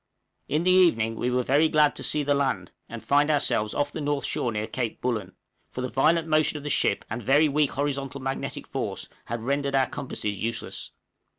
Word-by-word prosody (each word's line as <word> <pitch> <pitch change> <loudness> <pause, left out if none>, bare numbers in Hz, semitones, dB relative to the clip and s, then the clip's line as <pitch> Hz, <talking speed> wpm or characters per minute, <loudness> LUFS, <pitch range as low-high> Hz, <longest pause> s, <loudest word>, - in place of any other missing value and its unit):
In 155 +4 0
the 185 - +4
evening 115 -12 +4
we 120 - -1
were 125 0 +1
glad 150 +2 +3
to - - -5
see 150 - +1
the 145 0 +2
land, 130 -11 -1 0.2
and 115 -2 -8
find 145 +4 +3
ourselves 125 -7 +1
off 145 0 0
the 155 - -5
north 145 -1 -1
shore 120 - -1
near 105 -1 -2
Cape 120 -1 -3
Bullen, 110 -7 -3 0.3
for 125 - -6
the 130 - -2
violent 160 +6 +2
motion 155 -1 +2
of 145 - -8
the 145 - -2
ship 100 - +1
and 115 +3 -4
very 145 +7 +4
weak 150 0 +2
horizontal 140 -1 -2
magnetic 135 0 -4
force - - -4 0.2
had 115 -1 -4
rendered 140 +2 0
our 135 -1 +4
compasses 105 -7 -4
useless. 115 +1 -4
140 Hz, 200 wpm, -26 LUFS, 120-145 Hz, 0.3 s, the